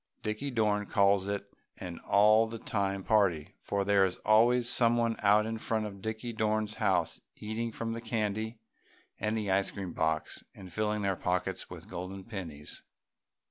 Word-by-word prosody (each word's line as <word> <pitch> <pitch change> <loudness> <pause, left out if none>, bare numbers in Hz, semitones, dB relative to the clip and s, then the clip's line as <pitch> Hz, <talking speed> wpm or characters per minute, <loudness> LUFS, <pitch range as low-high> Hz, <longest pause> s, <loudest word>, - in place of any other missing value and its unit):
Dickie 110 +6 -2
Dorn 105 -4 +1
calls 100 -1 +3
it 100 0 -4 0.2
an 90 -3 -7
"All 110 +2 +5
The 115 +1 -6
Time 100 -3 -2
Party," 95 -8 +2
for 100 0 -1
there 100 -1 +4
is 95 -1 +1
always 120 +3 +5
someone 115 -1 +3
out 105 +1 +5
in 110 0 -3
front 110 -1 -1
of 100 -2 -8
Dickie 110 +3 -4
Dorn's 110 -1 0
house 95 -4 +1
eating 110 +2 -3
from 115 +1 -3
the 115 - -5
candy 110 0 -2 0.6
and 110 +2 0
the 105 -3 -1
ice 95 +1 +2
cream 95 -4 -6
box 80 -1 -1
and 90 -3 -11
filling 105 0 0
their 100 -1 +1
pockets 90 +1 -2
with - - -10
golden 95 +2 -6
pennies. 85 -10 -5
105 Hz, 165 wpm, -31 LUFS, 95-110 Hz, 0.6 s, All